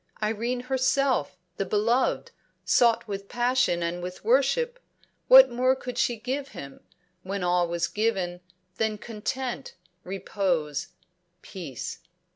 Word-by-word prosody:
Irene 225 +3 -1
herself, 260 - +1 0.2
the - - 0
beloved, 235 - +1 0.3
sought 235 -1 +3
with 200 -1 -6
passion 245 -7 +1
and 170 +1 -2
with 180 +3 -7
worship, 380 - +2 0.5
what - - +9
more 255 +2 +2
could 250 -1 -6
she 240 - +2
give 260 +5 -3
him, 140 0 -8 0.4
when 195 +1 -4
all 175 0 +2
was 170 0 -1
given, 190 -5 -1 0.4
than 220 -1 0
content, 245 +4 -5 0.3
repose, 180 -6 -2 0.6
peace? 160 -10 -7
220 Hz, 115 wpm, -26 LUFS, 180-255 Hz, 0.6 s, what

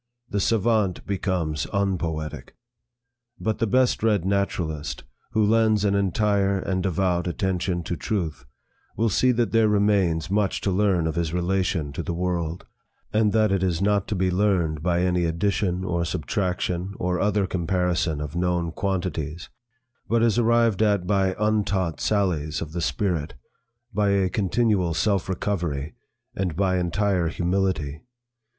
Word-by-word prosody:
The 100 - 0
savant 110 -2 +1
becomes 90 -6 -1
unpoetic. 85 -6 -2 0.8
But 110 +4 -1
the 115 - +1
best 130 +4 +2
read 105 -5 +2
naturalist 80 -7 -2 0.3
who 110 -1 +3
lends 110 -1 +3
an 100 - +2
entire 100 0 +1
and 95 0 -1
devout 90 -1 0
attention 90 -1 -1
to 85 - -3
truth, 90 -6 -3 0.5
will 115 +2 +2
see 125 +5 +3
that 115 -5 0
there 115 0 +4
remains 100 -5 +2
much 100 -1 +1
to 100 - 0
learn 95 -3 +2
of 80 - -1
his 85 -1 -2
relation 90 -4 0
to - - -3
the 85 - -4
world, 85 -1 -2 0.5
and 105 -1 +3
that 110 -2 +3
it 95 -2 +1
is 90 -3 0
not 100 0 +1
to 105 - -2
be 95 0 +1
learned 90 -6 +1
by 85 +1 +1
any 90 -1 +1
addition 90 +2 0
or 85 -2 -1
subtraction 90 +3 -2
or 90 0 -1
other 105 -1 +2
comparison 90 -3 0
of 75 +2 -5
known 90 -1 0
quantities, 85 -4 -3 0.6
but 115 0 +3
is 115 0 +3
arrived 115 -3 +3
at 100 -4 +2
by 95 -1 +1
untaught 105 -5 0
sallies 85 -7 0
of 75 - -6
the 85 +1 -3
spirit, 85 - -1 0.6
by 100 0 +2
a 100 -2 +2
continual 100 -3 +1
self 100 +2 +1
recovery, 85 -7 -2 0.4
and 90 -4 -2
by 95 0 +1
entire 90 0 +1
humility. 85 -4 -1
95 Hz, 145 wpm, -24 LUFS, 85-100 Hz, 0.8 s, there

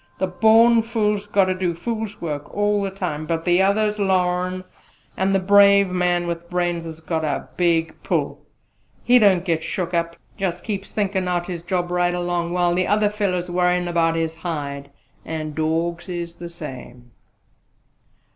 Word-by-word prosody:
The 190 - 0
born 225 +5 +5
fool's 210 -3 -1
got 200 -2 +3
to 185 - 0
do 185 -2 -2
fool's 220 +3 -4
work 150 -3 -5
all 205 0 +1
the 195 - -1
time: 175 -6 -4
but 165 0 -2
the 175 +1 +4
others 210 +2 +1
larn; 185 -1 0 0.5
and 195 +1 +1
the - - +3
brave 200 0 +5
man 180 -1 +1
with 170 0 -5
brains 175 -2 -1
's 160 0 -8
got 160 -1 -2
a 145 -3 -2
big 165 -1 +1
pull. - - -2 0.6
He 250 +1 +5
don't 190 -5 +4
get 165 -3 0
shook 180 -3 -3
up 170 0 -1 0.2
jus' 180 -3 -2
keeps 200 -3 -5
on - - -25
thinkin' 195 -3 0
out 175 -1 -1
his 175 -2 -5
job 175 0 -2
right 175 0 +1
along, 175 -1 -2
while 175 -1 +1
the 180 +1 0
other 205 0 +2
feller's 185 -4 -2
worryin' 180 0 +1
about 165 -1 +1
his 165 0 -2
hide! 145 -4 -5 0.3
An' 155 -1 -5
dawgs 165 +3 -1
is 170 -1 -4
the 170 0 -9
same." 125 -7 -10
180 Hz, 175 wpm, -22 LUFS, 170-195 Hz, 0.6 s, born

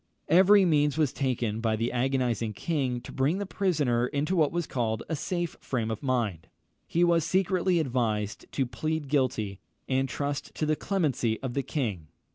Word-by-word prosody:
Every 190 +4 +6
means 150 -3 +2
was 150 -5 +2
taken 120 -5 -1
by 110 -1 +1
the 115 +2 -1
agonised 120 -4 0
king 130 - -1
to - - -10
bring 140 +7 +1
the 200 - -2
prisoner 150 -12 +1
into 145 +7 -1
what 155 -4 +3
was 170 -1 -1
called 115 -4 -2
a 160 - -1
safe 175 +2 -3
frame 115 -4 -2
of 110 - -4
mind. 115 - -1 0.4
He 170 - +2
was 170 -2 +4
secretly 185 +1 +2
advised 115 -8 -1
to 135 - +1
plead 150 +5 -3
guilty, 120 -8 0 0.3
and 135 0 +1
trust 140 +2 -3
to 155 - -1
the 155 0 +2
clemency 145 - 0
of 130 -3 -3
the 140 - 0
king. 110 - -3
135 Hz, 175 wpm, -28 LUFS, 120-160 Hz, 0.4 s, Every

